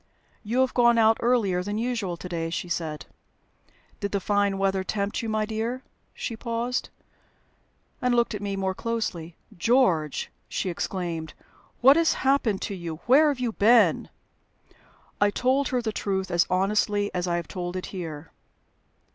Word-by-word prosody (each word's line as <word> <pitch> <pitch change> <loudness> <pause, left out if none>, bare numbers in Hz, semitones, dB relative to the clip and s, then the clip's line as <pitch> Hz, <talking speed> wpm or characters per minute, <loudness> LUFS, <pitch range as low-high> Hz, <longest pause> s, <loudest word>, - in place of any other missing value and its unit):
"You 235 +4 +1
have 260 - +1
gone 240 -1 +4
out 225 0 +5
earlier 225 -7 +2
than 205 +3 -3
usual 225 -7 -2
to 180 - -7
day," 165 -2 -3
she 170 +2 -3
said. 160 -3 -3 0.9
"Did 200 -1 -3
the 200 - +1
fine 205 0 +1
weather 195 -1 +1
tempt 200 +2 -2
you, 225 - -4
my 215 0 0
dear?" 230 +4 -3 0.3
She 230 - -4
paused, 235 +2 -2 1.1
and 250 -1 +2
looked 235 -1 +2
at 210 - -5
me 200 -1 -2
more 190 -1 -1
closely. 185 -7 -3 0.2
"George!" 175 - +1 0.2
she 185 - -2
exclaimed, 170 -3 -4 0.5
"what 270 +4 +7
has 330 -1 +3
happened 260 -7 +2
to - - -3
you? 170 -4 -5
Where 280 +6 +6
have 285 -3 0
you 245 -2 -1
been?" 225 +3 +4 1.1
I 205 - +5
told 260 +6 +1
her 250 -2 -1
the 220 - -1
truth 190 -2 -2
as 175 0 +3
honestly 205 +2 +1
as 180 0 -2
I 175 - 0
have 170 -1 -3
told 175 0 -5
it 185 - -3
here. 160 -5 -6
205 Hz, 165 wpm, -26 LUFS, 180-235 Hz, 1.1 s, what